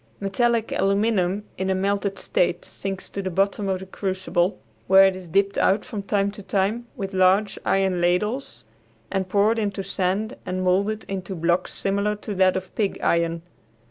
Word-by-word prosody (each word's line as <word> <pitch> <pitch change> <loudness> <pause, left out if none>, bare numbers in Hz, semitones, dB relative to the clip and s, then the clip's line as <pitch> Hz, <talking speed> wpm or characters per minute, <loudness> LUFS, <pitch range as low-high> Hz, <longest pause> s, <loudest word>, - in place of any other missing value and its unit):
Metallic 230 +3 +1
aluminum 200 -1 +1 0.2
in 190 0 -1
a 190 - +2
melted 200 +1 -1
state - - 0
sinks 195 -1 -5
to 200 - -3
the 190 - -3
bottom 195 +2 0
of 190 -1 -1
the - - -7
crucible, 185 -1 -1 0.3
where 190 0 +8
it 190 -1 +2
is 185 -2 -10
dipped 200 +3 +2
out 200 +2 +2
from 210 - -5
time 200 0 0
to 205 - -10
time 205 +5 -1
with 195 -1 -5
large 190 +2 +3
iron 190 -2 +1
ladles 210 +10 -1 0.5
and 190 -2 -1
poured 210 +4 +3
into 200 -2 -2
sand 195 +5 -1
and 185 0 -3
molded 200 +4 +1
into 190 0 -4
blocks 170 +2 0
similar 200 +2 0
to 210 0 -6
that 185 -1 +3
of 185 0 -7
pig 205 -3 -1
iron. 170 0 +1
195 Hz, 175 wpm, -24 LUFS, 185-205 Hz, 0.5 s, where